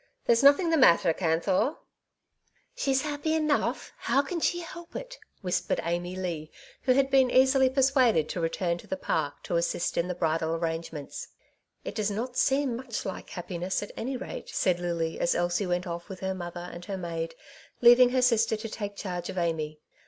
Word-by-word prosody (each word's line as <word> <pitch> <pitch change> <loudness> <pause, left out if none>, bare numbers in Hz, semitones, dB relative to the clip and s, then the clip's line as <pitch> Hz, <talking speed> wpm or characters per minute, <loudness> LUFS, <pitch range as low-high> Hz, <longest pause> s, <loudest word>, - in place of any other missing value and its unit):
There's 230 0 +4
nothing 285 +5 +6
the 325 - +4
matter, 170 - +5
Canthor! 185 - +1 0.3
'' - - -54
'* - - -41
She's 270 - +1
happy 300 +1 -1
enough; 305 -2 0
how 275 - +1
can 340 +4 -3
she 350 +2 0
help 340 0 -10
it? - - -7
" - - -41
whispered 180 -1 0
Amy 175 +2 -2
Leigh, 170 -5 -4 0.3
who 255 - +3
had 270 +1 +2
been 265 -2 +5
easily 265 +1 +5
per 270 +1 +1
suaded 255 - +4
to - - -3
return 170 +1 -1
to - - -13
the 190 - -3
Park 155 -5 -2
to 170 - -1
assist 170 0 0
in 170 - 0
the 180 - -3
bridal 160 -1 0
arrangements. 165 -3 -4 0.6
"It - - -4
does 215 -2 -1
not 235 +5 -4
seem 270 -1 +2
much 245 -2 -5
like 190 - -6
happiness, 180 +2 -3
at 205 - -8
any 260 +2 -3
rate," 260 - -7
said 180 -2 +1
Lily, 170 -2 -2
as 170 - +2
Elsie 175 +3 0
went 180 0 -1
off 170 +2 -6
with 185 -2 -8
her 190 0 -1
mother 175 -1 -6
and 175 - -8
her 195 -2 -4
maid, 165 -2 -4 0.5
leaving 245 +1 +8
her 255 0 +1
sister 225 -3 +3
to 225 +1 -6
take 205 -1 -5
charge 180 -3 -4
of - - -6
Amy. 155 -3 -2
190 Hz, 195 wpm, -28 LUFS, 170-260 Hz, 0.6 s, leaving